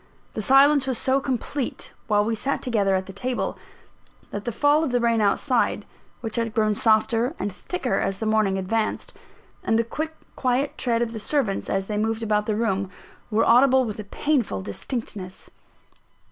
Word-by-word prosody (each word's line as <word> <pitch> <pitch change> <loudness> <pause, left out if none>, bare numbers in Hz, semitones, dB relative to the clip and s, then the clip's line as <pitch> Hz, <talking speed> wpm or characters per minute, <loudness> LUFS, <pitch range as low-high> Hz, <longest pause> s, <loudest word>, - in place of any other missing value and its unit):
The 215 - -3
silence 275 +4 +5
was 260 -3 0
so 265 +3 +2
complete, 265 0 -4
while 210 -1 +3
we 225 - 0
sat 270 +5 -2
together 205 -6 +1
at 190 0 -1
the 195 - -9
table, 245 +6 -2 0.8
that 205 0 -5
the 240 - -1
fall 290 +6 +3
of 295 - -1
the 245 - +2
rain 230 -1 +2
outside 235 +5 +1 0.4
(which 225 0 -5
had 230 0 -1
grown 215 -2 +2
softer 225 +5 +2
and 200 -1 -3
thicker 270 - -2
as 195 - -1
the 220 - -4
morning 215 -3 +2
advanced), 215 +4 -2 0.5
and 225 - +2
the 230 - +3
quick, 315 +7 -4 0.2
quiet 260 +2 0
tread 235 -2 0
of 230 - -3
the 220 - -5
servants, 225 -4 -1
as 195 0 0
they 210 +1 -3
moved 225 +1 -1
about 210 -1 0
the 215 - 0
room, 200 -4 0 0.4
were 225 0 +2
audible 260 +2 +5
with 215 -2 -5
a - - -4
painful 240 - -1
distinctness. 190 - -6
225 Hz, 180 wpm, -24 LUFS, 210-255 Hz, 0.8 s, silence